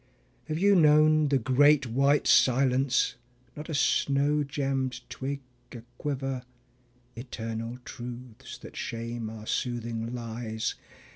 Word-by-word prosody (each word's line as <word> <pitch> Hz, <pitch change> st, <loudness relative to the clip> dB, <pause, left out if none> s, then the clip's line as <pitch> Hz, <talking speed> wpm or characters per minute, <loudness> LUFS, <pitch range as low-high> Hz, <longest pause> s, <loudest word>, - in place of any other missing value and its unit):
Have 155 Hz, -1 st, -3 dB
you 200 Hz, +4 st, +4 dB
known 155 Hz, -2 st, +5 dB
the 140 Hz, -1 st, +3 dB
Great 135 Hz, +3 st, +4 dB
White 140 Hz, +5 st, +2 dB
Silence, 130 Hz, -1 st, +3 dB, 0.4 s
not 150 Hz, +3 st, -8 dB
a 155 Hz, -, -2 dB
snow 145 Hz, +2 st, +2 dB
gemmed 135 Hz, -3 st, -2 dB
twig 140 Hz, +1 st, -4 dB, 0.3 s
aquiver? 130 Hz, +2 st, -5 dB, 0.7 s
(Eternal 115 Hz, -1 st, -5 dB
truths 120 Hz, -1 st, -9 dB
that -, -, -12 dB
shame 115 Hz, -1 st, -4 dB
our 110 Hz, -1 st, -9 dB
soothing 115 Hz, 0 st, -3 dB
lies). 115 Hz, -2 st, -4 dB
130 Hz, 110 wpm, -28 LUFS, 120-145 Hz, 0.7 s, known